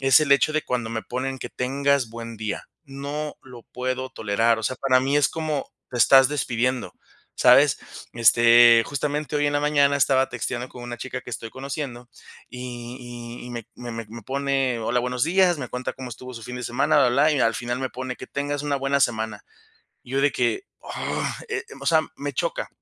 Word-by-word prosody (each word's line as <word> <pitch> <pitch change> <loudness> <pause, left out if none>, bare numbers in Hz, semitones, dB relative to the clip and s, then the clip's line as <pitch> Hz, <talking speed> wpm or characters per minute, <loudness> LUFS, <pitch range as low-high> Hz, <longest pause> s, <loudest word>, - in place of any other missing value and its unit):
es 135 -1 +6
el 140 -2 +3
hecho 140 +3 +3
de 155 - +1
cuando 120 -3 -2
me 110 -1 -3
ponen: 130 +1 -4
"Que - - -7
tengas 140 0 0
buen 115 0 -8
día". 110 -2 -4 0.2
No 145 +2 -5
lo 125 -3 -12
puedo 130 +1 -4
tolerar, 115 0 +1
o - - -6
sea, 130 - -1
para 130 0 +3
mí 135 +2 +1
es 145 - +4
como: 155 -3 -3 0.2
"Te 125 - -5
estás 135 +2 +7
despidiendo", 130 -3 -1 0.4
¿sabes?, - - +5 0.3
este, 120 0 +7
justamente, 145 +1 -2
hoy 145 0 +2
en 145 - 0
la - - +3
mañana 145 -1 +3
estaba 135 -1 +3
texteando 125 0 -4
con 125 - -11
una 120 0 -6
chica 125 0 -5
que 125 - -9
estoy 115 -1 -5
conociendo, 130 -2 -6 0.4
y 125 -1 -7 0.4
y - - -9
y - - -8
me 120 -2 -6
me 120 -1 -8
me 115 0 -5
me 115 +1 -9
pone: 135 0 0
"Hola, 120 +2 0
buenos 125 +1 0
días", 180 +1 +3
me 130 -3 -5
cuenta 125 0 -4
cómo 130 -2 -8
estuvo 125 +2 -9
su 115 - -8
fin 125 +1 -6
de 125 - -6
semana, 120 +5 +1
bla, 135 - +5
bla, 125 +4 +3
blá, - - +3
y 140 - +1
al 115 0 +3
final 120 +1 -3
me 130 - -1
pone: 130 0 -5
"Que - - -9
tengas 145 +1 -3
una 145 -1 0
buena 135 +1 0
semana". 110 -4 0 0.6
Y 125 - -12
yo 135 - +2
de 145 -1 +3
que, 120 -3 0 0.2
"Oh" - - -4 0.2
eh, - - -2 0.2
o 140 - -8
sea, 160 0 +5 0.2
me 145 0 -4
choca, - - -2
130 Hz, 215 wpm, -24 LUFS, 120-140 Hz, 0.6 s, estás